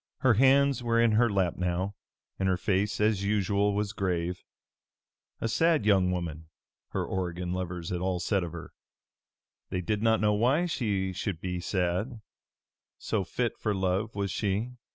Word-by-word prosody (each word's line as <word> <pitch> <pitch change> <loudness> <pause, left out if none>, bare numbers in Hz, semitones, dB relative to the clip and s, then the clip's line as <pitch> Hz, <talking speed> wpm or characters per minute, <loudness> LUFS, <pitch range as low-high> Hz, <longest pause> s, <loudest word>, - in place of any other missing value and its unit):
Her 130 -3 +5
hands 135 +3 +4
were 115 -1 +1
in 115 -1 +4
her 115 +2 +4
lap 95 -4 0
now, 90 +2 -1 0.5
and 95 0 +1
her 95 - +2
face 100 +2 0
as 105 -2 +2
usual 100 0 +1
was 105 0 -1
grave. 90 -3 -2 1.0
A - - -1
sad 155 +2 +2
young 95 -3 +4
woman, 85 -3 -4 0.4
her - - -2
Oregon 90 -1 -3
lovers 90 -2 -4
all 90 0 -1
said 95 0 0
of 85 - -5
her. 85 0 -9 1.0
They 90 - -2
did 105 +3 -1
not 110 0 +3
know 105 0 +3
why 130 +11 +2
she 100 - -1
should 90 -2 -3
be 90 0 -3
sad, 95 +6 -1 0.8
so 105 -3 -1
fit 120 +5 -2
for 105 -2 0
love 95 +3 -1
was 100 -2 -1
she. 105 +4 -1
100 Hz, 160 wpm, -29 LUFS, 90-110 Hz, 1.0 s, Her